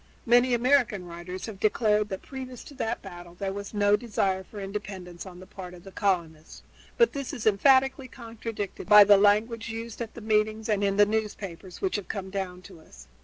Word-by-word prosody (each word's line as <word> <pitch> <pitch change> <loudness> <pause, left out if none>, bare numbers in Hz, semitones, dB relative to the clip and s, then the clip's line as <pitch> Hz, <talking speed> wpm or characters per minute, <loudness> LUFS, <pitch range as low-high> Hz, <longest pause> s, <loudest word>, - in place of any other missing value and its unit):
Many 245 +1 +4
American 240 -6 +2
writers 175 +2 -7
have 215 -4 -8
declared 210 0 +2
that 190 - -5
previous 255 -3 -8
to - - -12
that 235 -3 -3
battle 175 -2 -10
there 195 +1 -3
was 200 0 -6
no 205 -1 +3
desire 195 -4 -1
for 205 +2 -11
independence 195 -3 -7
on 180 -1 -11
the 185 - -11
part 185 -2 -9
of 175 - -15
the 195 - -11
colonists, 170 -6 -2 0.3
but 470 -1 +4
this 275 -2 -5
is 225 - -6
emphatically 265 +5 +4
contradicted 225 -5 -7
by 210 -1 +10
the 205 0 +7
language 220 +3 +2
used 225 +1 -6
at 230 - -6
the 235 - -8
meetings 215 0 0
and 205 -1 +1
in 195 0 +1
the 205 - +7
newspapers 205 -4 -4
which 380 - 0
have 205 - -7
come 190 -2 -5
down 185 -2 -4
to 185 -4 -13
us. - - -16
205 Hz, 200 wpm, -27 LUFS, 190-230 Hz, 0.3 s, by